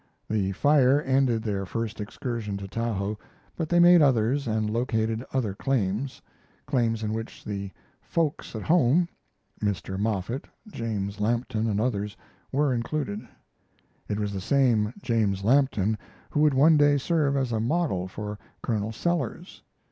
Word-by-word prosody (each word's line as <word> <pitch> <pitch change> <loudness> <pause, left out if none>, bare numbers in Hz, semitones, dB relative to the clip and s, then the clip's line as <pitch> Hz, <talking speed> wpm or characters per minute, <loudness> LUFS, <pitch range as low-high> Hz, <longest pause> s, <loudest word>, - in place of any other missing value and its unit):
The 100 -3 0
fire 140 +3 +4
ended 130 -5 +2
their 100 -3 -1
first 115 +2 -4
excursion 105 -1 -4
to 100 0 -6
Tahoe, 105 -1 -2 0.4
but 160 -2 -3
they 175 - +4
made 175 0 +8
others 130 0 +3
and 110 -1 0
located 115 0 0
other 120 -7 0
claims 115 +1 -1 0.4
claims 115 -3 0
in 110 0 -1
which 115 +1 -6
the 100 -1 -4 0.3
"folks 155 -7 -2
at 110 - -4
home," 165 +1 +4 0.5
Mr. 95 -2 -2
Moffett, 110 +4 -2 0.2
James 105 - -4
Lampton, 115 +1 0
and 105 -2 0
others, 105 -2 -1 0.3
were 140 0 +2
included. 120 -3 -2 0.9
It 105 - -1
was 105 -1 -2
the 95 - -3
same 115 -2 +2
James 110 -6 +1
Lampton 110 -4 +2 0.3
who - - 0
would 150 -2 +4
one 155 +4 +6
day 145 -1 +5
serve 140 -1 +1
as 130 -3 0
a 110 - 0
model 120 - 0
for 105 +2 -6 0.2
Colonel 110 -2 -1
Sellers. 175 - -3
115 Hz, 145 wpm, -26 LUFS, 105-135 Hz, 0.9 s, made